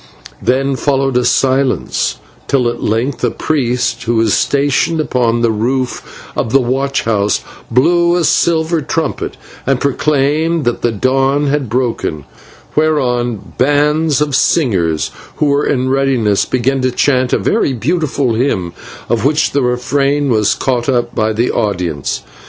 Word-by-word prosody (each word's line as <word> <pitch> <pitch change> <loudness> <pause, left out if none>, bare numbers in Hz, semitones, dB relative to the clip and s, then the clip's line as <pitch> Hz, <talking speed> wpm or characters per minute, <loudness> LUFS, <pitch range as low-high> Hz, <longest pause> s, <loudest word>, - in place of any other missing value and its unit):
Then 135 +1 +1
followed 135 -2 0
a 125 - +3
silence, 130 - +1 0.3
till 130 -3 +1
at 120 - -6
length 120 +6 -1
a 120 - +3
priest 125 -3 -1
who 120 0 0
was 110 -2 +2
stationed 145 +3 +1
upon 120 -5 0
the 115 - +3
roof 125 +4 -3
of 110 - -2
the 135 - +5
watch 135 +2 -1
house 105 -2 +1 0.3
blew 170 +8 +3
a 175 - +1
silver 160 0 +2
trumpet 155 +1 -3 0.3
and 135 -2 +2
proclaimed 150 +3 0
that 120 - -1
the 120 - +1
dawn 135 +5 +1
was 150 0 +1
broken, 120 - -2 0.5
whereon 125 -8 0
bands 150 +2 +2
of 150 -1 0
singers 90 - +1 0.2
who - - 0
were 145 0 +1
in 130 -2 0
readiness 130 -7 +1
began 130 +2 0
to 130 - +1
chant 130 0 +1
a - - +3
very 210 -11 0
beautiful 140 -2 0
hymn 110 -8 -1 0.3
of 120 - 0
which 150 +3 +2
the 140 - +1
refrain 135 +3 0
was 110 -2 +2
caught 125 -1 -1
up 120 -2 0
by 110 0 0
the 115 +3 0
audience. 90 - -2
130 Hz, 145 wpm, -15 LUFS, 120-145 Hz, 0.5 s, the